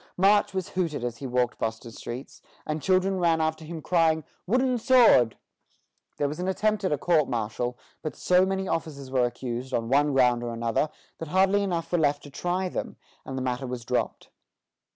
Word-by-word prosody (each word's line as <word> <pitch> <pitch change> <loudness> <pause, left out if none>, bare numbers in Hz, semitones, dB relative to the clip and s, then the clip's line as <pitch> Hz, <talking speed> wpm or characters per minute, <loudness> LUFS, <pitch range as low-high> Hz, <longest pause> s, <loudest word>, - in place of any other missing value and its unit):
March 205 +3 +4
was 190 -2 -3
hooted 165 -8 -2
as 120 -1 -3
he 135 - -6
walked 125 -1 0
Boston 115 +1 -3
streets, 120 +3 -8 0.2
and 155 0 -3
children 190 +1 +2
ran 165 -2 +3
after 160 0 -1
him 160 -1 -7
crying, 160 -3 +2 0.2
"Wooden 250 +3 +2
sword!" 230 - +5 0.8
There 145 - +1
was 150 +4 -5
an 180 - -2
attempt 210 +2 0
at 185 - 0
a 150 - +2
court 155 -1 +2
martial; 120 +1 -2 0.2
but 155 - -5
so 180 0 +3
many 190 0 -1
officers 140 -6 -4
were 130 -2 +3
accused, 120 +1 -4
on 115 0 -2
one 145 +2 +3
ground 125 -2 +4
or 120 -1 -3
another, 115 +6 0 0.3
that 165 - -5
hardly 190 +4 +3
enough 175 -4 -2
were 175 - +2
left 145 -2 +1
to 145 - -11
try 180 +5 -1
them, - - -5 0.3
and 135 - -4
the 130 - -2
matter 125 +1 -2
was 125 -2 -5
dropped. 125 0 -2
155 Hz, 195 wpm, -26 LUFS, 125-185 Hz, 0.8 s, sword